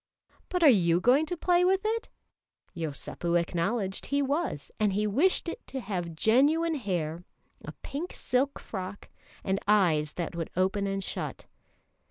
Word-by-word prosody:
"But 360 -2 0
are - - +8
you 175 -9 +5
going 260 +10 +4
to 355 - -3
play 355 +1 +3
with 380 +1 +3
it?" 455 +1 -1 0.7
Yosépu 170 +2 -1
acknowledged 190 +4 -2
he 280 - +1
was, 280 - -2
and 210 -2 +2
he 210 +2 +1
wished 290 - +2
it 335 - -6
to 270 - -4
have 180 -7 -4
genuine 290 - +3
hair, 175 - -2 0.4
a - - -6
pink 315 +6 -5
silk 260 +3 0
frock, 190 -1 -7 0.3
and 190 0 0
eyes 165 -8 +3
that 175 0 -4
would 165 -1 -3
open 195 +2 +1
and 195 0 -2
shut. - - -5
205 Hz, 155 wpm, -28 LUFS, 175-285 Hz, 0.7 s, are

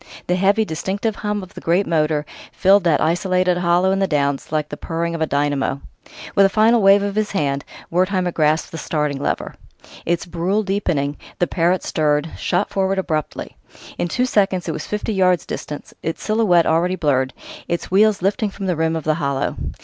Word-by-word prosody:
The 180 - +1
heavy, 200 +4 +2
distinctive 200 +6 -3
hum 210 -1 -2
of 185 - -12
the - - -9
great 175 +4 +2
motor 155 -2 +1 0.3
filled 195 +2 +4
that 160 -4 +3
isolated 180 +2 +1
hollow 175 +2 +2
in 195 - +1
the 195 - +2
Downs 140 -4 -1
like 155 -1 -1
the - - -5
purring 170 +2 -3
of 165 - -4
a 160 - +1
dynamo. 140 -1 0 0.5
With 200 - +5
a 195 - +5
final 220 +3 +4
wave 200 +1 +6
of 200 0 -2
his 215 0 0
hand, 140 -5 0 0.3
Wertheimer 185 +1 +1
grasped 155 -1 +1
the 165 - -6
starting 150 -3 -2
lever. - - -2 0.5
Its 170 0 -1
brool 180 +5 -1
deepening, 175 -8 -1 0.2
the 175 - +2
Parrott 175 +1 +1
stirred, 150 0 0
shot 185 +3 -1
forward 195 0 0
abruptly. 155 -5 -3 0.4
In - - 0
two 250 +9 0
seconds 195 -7 +1
it - - 0
was - - -5
fifty 210 +1 -2
yards 185 -4 +2
distant, 150 - -7
its 165 - -4
silhouette 215 -6 +3
already 170 +3 +2
blurred, 130 -6 +1 0.4
its 170 +1 -3
wheels 205 0 +3
lifting 205 +3 +1
from 195 0 -7
the 180 -2 0
rim 160 +1 0
of 160 - -3
the 155 - +2
hollow. 140 0 -1
175 Hz, 190 wpm, -20 LUFS, 155-195 Hz, 0.5 s, wave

